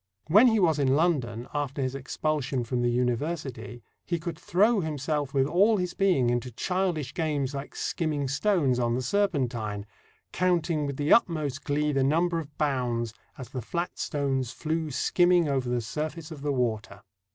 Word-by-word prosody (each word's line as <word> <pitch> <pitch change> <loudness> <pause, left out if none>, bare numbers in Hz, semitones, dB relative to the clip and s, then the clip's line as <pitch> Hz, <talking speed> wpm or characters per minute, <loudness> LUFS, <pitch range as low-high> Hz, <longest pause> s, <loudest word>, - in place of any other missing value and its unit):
When 210 +10 +7
he 225 -2 +3
was 160 -5 +3
in 135 -1 +3
London 130 -8 0
after 145 -2 -2
his 130 -1 -1
expulsion 135 -1 -2
from 120 +1 -2
the 120 - +2
University, 125 -1 -2 0.2
he 170 - -1
could 165 0 -5
throw 210 +5 +3
himself 150 -3 -2
with 135 -2 +2
all 200 +9 +3
his 180 -2 -2
being 160 -12 +2
into 120 +1 -1
childish 170 - -1
games 145 -5 -1
like 140 0 -6
skimming 150 -4 -1
stones 145 -3 +1
on 120 -1 +1
the 130 - -2
Serpentine, 125 - -1 0.5
"counting 170 -4 +1
with 140 -1 -4
the 145 +1 +3
utmost 155 - +1
glee 150 +1 0
the 135 -2 +1
number 165 +4 +2
of 150 -2 -9
bounds, 125 -6 -1 0.2
as 130 -4 -8
the 130 - -5
flat 170 +9 -4
stones 135 -4 -1
flew 160 +2 -2
skimming 175 +4 +3
over 135 -3 0
the 120 -1 0
surface 155 +8 -5
of 150 -3 -8
the 145 0 -1
water." 120 -5 -2
145 Hz, 170 wpm, -27 LUFS, 125-165 Hz, 0.5 s, When